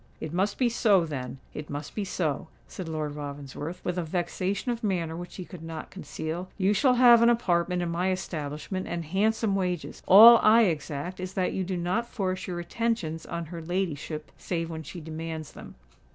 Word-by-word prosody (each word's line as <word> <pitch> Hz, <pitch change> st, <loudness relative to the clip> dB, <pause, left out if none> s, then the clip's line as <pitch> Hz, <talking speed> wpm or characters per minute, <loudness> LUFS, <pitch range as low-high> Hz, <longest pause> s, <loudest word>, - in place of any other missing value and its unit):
"It 160 Hz, 0 st, -6 dB
must 195 Hz, +3 st, 0 dB
be 255 Hz, -, +3 dB
so, 210 Hz, -6 st, +3 dB
then—it 140 Hz, +1 st, -7 dB
must 145 Hz, +1 st, -6 dB
be 210 Hz, -, -2 dB
so," 165 Hz, -6 st, -2 dB, 0.2 s
said 180 Hz, -3 st, -7 dB
Lord 155 Hz, -2 st, -3 dB
Ravensworth, 145 Hz, +3 st, -6 dB
with 180 Hz, 0 st, -1 dB
a -, -, -1 dB
vexation 185 Hz, +6 st, -2 dB
of 235 Hz, -1 st, -4 dB
manner 170 Hz, -6 st, -1 dB
which 175 Hz, +1 st, -8 dB
he 185 Hz, -, -6 dB
could 180 Hz, -3 st, -11 dB
not 165 Hz, -1 st, -7 dB
conceal. 175 Hz, -1 st, -5 dB
"You 195 Hz, +1 st, +3 dB
shall 255 Hz, +4 st, +4 dB
have 240 Hz, -2 st, +7 dB
an 235 Hz, -, +6 dB
apartment 180 Hz, -6 st, +1 dB
in 170 Hz, -, -2 dB
my 180 Hz, +3 st, 0 dB
establishment 160 Hz, 0 st, -4 dB
and 170 Hz, -1 st, -3 dB
handsome 210 Hz, +5 st, +1 dB
wages:—all 195 Hz, +5 st, +7 dB
I 225 Hz, +2 st, +6 dB
exact 160 Hz, -1 st, -2 dB
is 185 Hz, 0 st, -5 dB
that 185 Hz, -1 st, 0 dB
you 190 Hz, -, -1 dB
do 185 Hz, 0 st, -3 dB
not 185 Hz, +7 st, -1 dB
force 185 Hz, -5 st, -2 dB
your 175 Hz, -2 st, -3 dB
attentions 175 Hz, -5 st, -2 dB
on 170 Hz, 0 st, -4 dB
her 170 Hz, -, -5 dB
ladyship 160 Hz, -3 st, -3 dB
save 165 Hz, -2 st, -3 dB
when 160 Hz, -1 st, -5 dB
she 165 Hz, +3 st, -8 dB
demands 160 Hz, 0 st, -6 dB
them." -, -, -11 dB
175 Hz, 185 wpm, -27 LUFS, 160-195 Hz, 0.2 s, have